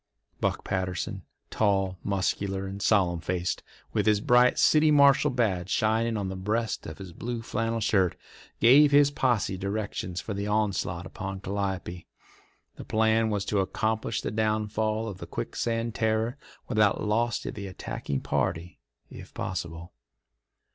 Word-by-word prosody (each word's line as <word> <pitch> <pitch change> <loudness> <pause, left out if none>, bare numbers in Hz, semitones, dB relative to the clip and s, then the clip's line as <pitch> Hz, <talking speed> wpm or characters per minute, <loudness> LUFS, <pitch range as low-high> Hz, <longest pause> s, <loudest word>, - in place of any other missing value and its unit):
Buck - - -1
Patterson, 95 -1 -3 0.3
tall, 95 -3 +1
muscular, 95 0 -1
and 100 +1 -6
solemn 90 -5 +3
faced, 90 +1 -2 0.3
with - - +1
his 105 -1 +4
bright 125 +3 +4
"City 155 0 +5
Marshal" 140 0 +5
badge 105 -8 0
shining 110 +3 +1
on 100 -2 -2
the 95 - -4
breast 110 +5 -2
of 80 - -8
his 95 -3 -9
blue 120 +2 -5
flannel 115 0 -1
shirt, 95 -5 +2 0.4
gave 140 +6 +7
his 145 0 +5
posse 120 -9 0
directions 100 -2 -3
for 110 - -5
the 100 +1 -3
onslaught 100 -5 -1
upon 95 +1 -6
Calliope. 95 -3 -4 0.7
The - - -7
plan 110 0 +2
was 100 -2 -1
to 105 - 0
accomplish 110 +3 -1
the - - -3
downfall 110 0 0
of 95 -4 -7
the - - -8
Quicksand 115 - -2
Terror 110 +2 0 0.3
without 110 -4 +2
loss 115 +3 +1
to - - -4
the 100 -1 -7
attacking 70 -6 -4
party, 85 +1 -2 0.3
if - - -11
possible. 85 -3 -5
105 Hz, 145 wpm, -27 LUFS, 95-115 Hz, 0.7 s, gave